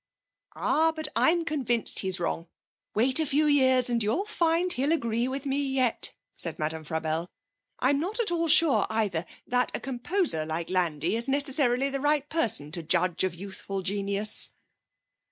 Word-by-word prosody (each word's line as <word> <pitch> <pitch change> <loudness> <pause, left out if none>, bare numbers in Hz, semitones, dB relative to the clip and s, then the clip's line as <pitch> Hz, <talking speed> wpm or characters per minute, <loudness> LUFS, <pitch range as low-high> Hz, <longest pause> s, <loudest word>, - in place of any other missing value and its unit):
'Ah, 320 +1 +2
but 315 -1 -6
I - - +4
am 340 0 +1
convinced 245 -7 0
he's 190 -1 0
wrong. 170 0 -2 0.5
Wait 255 +6 +4
a 315 - +1
few 295 +3 +2
years 260 -4 +4
and 240 -1 0
you'll 225 - 0
find 345 -2 +1
he'll 275 +4 0
agree 235 -5 0
with 270 +2 -4
me 280 +1 0
yet,' 265 -3 0 0.2
said 165 -2 0
Madame 155 +1 -3
Frabelle. 160 +2 -2 0.5
'I'm 275 +2 +2
not 385 +9 -3
at 445 -6 +2
all 335 -1 0
sure, 320 -2 +4
either, 205 -6 -1 0.2
that 250 0 0
a - - -3
composer 270 - 0
like 160 +2 -4
Landi 170 -1 0
is 235 +3 -1
necessarily 270 -2 +2
the 275 0 -2
right 295 0 +1
person 215 - 0
to 170 - -4
judge 175 +2 +1
of 185 -2 -1
youthful 195 +1 -6
genius.' 200 +2 -1
245 Hz, 170 wpm, -27 LUFS, 185-290 Hz, 0.5 s, I